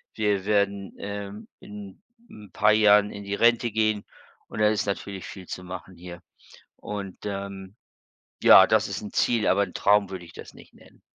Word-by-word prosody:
Wir 105 -3 0
werden, 100 -1 0
ähm, 100 +1 -7
in 105 - -11 0.3
'n 105 -3 -14
paar 105 0 +3
Jahren 105 -1 +4
in 100 - -9
die 100 0 -3
Rente 115 +1 +2
gehen. 110 -1 0 0.4
Und - - -8
da 105 - +5
ist 105 -1 -1
natürlich 100 -1 -5
viel 95 -3 -10
zu 90 - -7
machen 90 0 -9
hier. 85 0 -10 0.6
Und, 100 -3 -7
ähm, 100 -1 -6 0.7
ja, - - +9
das - - +2
ist - - -5
'n 105 - -8
Ziel, 115 -3 +1
aber 100 +2 +3
'n 90 - -13
Traum 100 0 +3
würde 95 -2 -7
ich 85 - -15
das - - -12
nicht - - -17
nennen. - - -21
100 Hz, 185 wpm, -25 LUFS, 95-105 Hz, 0.7 s, ja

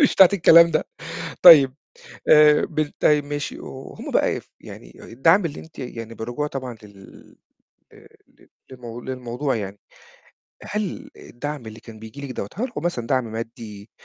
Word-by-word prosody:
مش 285 - +4
بتاعة 190 - +8
الكلام 170 -3 +6
ده. 155 - 0 0.6
طيب 145 -7 +9 0.5
آآ 150 -1 +6
بال 155 -2 -3
طيب 150 -1 +3
ماشي، 145 0 -5
وهم 135 0 -9
بقى - - +1
يف - - -9
يعني - - -13
الدَعم 165 - +2
اللي 150 -3 -5
أنتِ 160 -1 -14
يعني 115 -3 -7
بالرجوع 120 +6 -4
طبعًا 130 -4 -6
لل 100 -2 -16 0.6
آآ - - -18 0.2
ل - - -25 0.2
للمو 120 -2 -9
للموضوع 130 +2 -4
يعني، 100 -2 -6 0.8
هل 210 -2 -5
الدعم 145 0 -7
اللي 110 +1 -10
كان 115 -1 -13
بييجي 110 +5 -11
لِك - - -10
دَوّة، 100 - -5
هل 250 +5 -3
كو 150 - -6
مثلًا 150 -8 -3
دعم 130 0 +1
مادّي، 110 -2 -8
130 Hz, 160 wpm, -22 LUFS, 115-150 Hz, 0.8 s, طيب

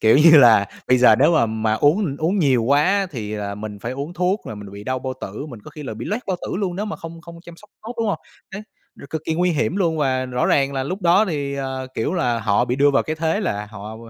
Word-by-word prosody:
kiểu 110 +2 +5
như 160 +1 +8
là, 115 -7 +7 0.2
bây 125 0 +5
giờ 120 -3 +6
nếu 145 - +4
mà 130 -7 +3
mà 110 0 -1
uống 145 - +2
uống 170 +7 0
nhiều 135 -8 +3
quá 140 +4 +3
á, 195 +1 +2
thì 110 -6 -5
là 100 -1 -4
mình 105 0 -7
phải 115 +5 -5
uống 140 +6 -5
thuốc 180 +4 0
rồi 110 - -6
mình 105 -1 -9
bị 100 +1 -9
đau 130 0 -2
bao 130 0 -4
tử, 105 +10 -6
mình 120 -7 -10
có - - -10
khi 150 0 -10
là 130 - -6
bị 110 - -7
loét 215 +5 -3
bao 185 -2 -1
tử - - -3
luôn, 185 -3 -2
nếu 205 - -2
mà 210 - -5
không 165 0 -9
không 170 0 -12
chăm 170 -1 -12
sóc 210 - -19
tốt, 230 +3 -7
đúng 230 - 0
hông? - - -1 0.3
Đấy, 200 +2 -6 0.3
r - - -14
cực 160 -1 -4
kỳ 160 - -1
nguy 180 +2 +1
hiểm 165 +2 -1
luôn 170 -5 +1
và 130 -3 0
rõ 125 0 -1
ràng 140 -1 +2
là 135 - -2
lúc 185 +9 -5
đó 180 +5 +4
thì, 145 -6 -3
ờ, 130 -1 -4
kiểu 130 +10 -1
là, 120 -10 0
họ 105 +3 +2
bị 125 0 -2
đưa 145 +1 +4
vào 140 - +2
cái 155 - -4
thế 160 +5 0
là 105 - -2
họ, 105 +1 -9
140 Hz, 290 wpm, -21 LUFS, 115-170 Hz, 0.3 s, như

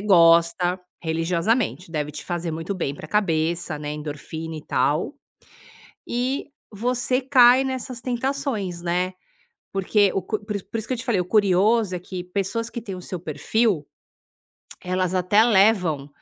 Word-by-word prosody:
gosta 175 -1 +4 0.2
religiosamente. 170 +4 0
Deve 150 -2 -2
te 150 - -8
fazer 175 -1 -3
muito 165 +5 -4
bem 140 -6 -2
pra - - -9
cabeça, 170 -5 0
né, 150 0 -4
endorfina 155 +2 -6
e 150 - -9
tal, 155 - +1 0.9
e 255 +4 -2 0.2
você 250 +4 0
cai 255 -1 +6
nessas 260 -2 -4
tentações, 245 -8 -2
né, 180 +2 0 0.6
porque 195 +1 +3
o 195 - 0
cu 210 +3 -3
po - - -17
por 210 -2 -2
isso 195 - -8
por - - -3
isso 220 - -6
que 255 - 0
eu - - -6
te 250 - -6
falei, 230 -7 +1
o 180 - -1
curioso 205 +1 +3
é - - -2
que 180 0 -6
pessoas 200 +5 -2
que 235 - -6
têm 195 -4 -6
o - - -8
seu 180 -1 -6
perfil, 165 +2 0 1.0
elas 185 0 -1
até 185 +4 +4
levam, 190 -10 +3
185 Hz, 165 wpm, -23 LUFS, 170-230 Hz, 1.0 s, cai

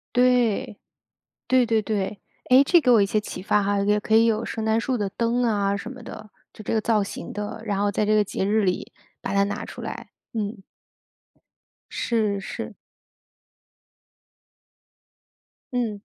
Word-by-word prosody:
对， 245 -5 +2 0.7
对 255 -1 +4
对 225 -1 +2
对。 205 -2 -3 0.3
哎， 260 +2 +7
这 345 +5 +5
给 255 -6 +3
我 230 -3 +6
一 200 - +4
些 215 +2 +1
启 210 - -7
发 205 +2 +2
哈， 200 0 +1
也 210 +1 +2
可 220 +1 +1
以 225 +1 +6
有 225 0 +1
圣 225 - -4
诞 220 +1 +2
树 255 +1 -1
的 205 -2 -1
灯 235 +4 0
啊 200 -3 +1
什 200 +4 -6
么 255 - -11
的， 215 - -9 0.2
就 215 - -11
这 - - -2
个 220 - +2
造 215 -2 +2
型 195 - -7
的， 210 +2 -5
然 200 -2 -1
后 205 0 +1
在 210 +1 0
这 215 - +2
个 210 - +4
节 195 - -3
日 215 +1 +2
里 180 -2 -1 0.3
把 - - -3
它 200 0 +4
拿 205 +1 -3
出 - - -9
来， - - -7 0.2
嗯。 210 -2 -3 1.3
是 215 -4 0
是。 195 - -6 3.0
嗯。 225 -5 -1
215 Hz, 180 characters per minute, -24 LUFS, 200-230 Hz, 3.0 s, 哎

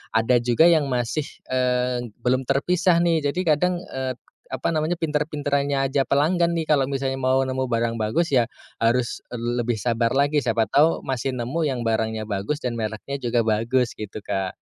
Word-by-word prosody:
ada 115 +2 +4
juga 120 +6 +4
yang 160 -4 +4
masih 125 +4 -1 0.2
eee, 125 -1 0
belum 130 +1 +1
terpisah 170 +5 +2
nih, 165 -3 +1
Jadi 180 +6 -1
kadang 175 +4 +2
eee, 130 -1 -3 0.3
apa - - -3
namanya 155 +2 0
pinter-pinterannya 145 -3 -1
aja 135 +1 +1
pelanggan 170 +4 +2
nih, 165 - -1
kalau 140 -3 +4
misalnya 135 -1 -2
mau 130 +1 +3
nemu 130 0 -2
barang 115 -1 0
bagus 160 +11 0
ya 125 -3 +4 0.4
harus 120 +1 +1
lebih 120 0 -1
sabar 115 +1 0
lagi, 145 +1 +2
siapa 115 -2 +1
tahu 150 +4 +3
masih 130 0 -2
nemu 125 +8 -2
yang 125 -3 -2
barangnya 110 -1 -1
bagus 100 +8 -2
dan 125 -2 -2
mereknya 110 +5 -4
juga 120 -1 +1
bagus, 115 +3 +1
gitu, 105 -1 -7
Kak. 95 -2 -3
130 Hz, 170 wpm, -23 LUFS, 115-150 Hz, 0.4 s, ada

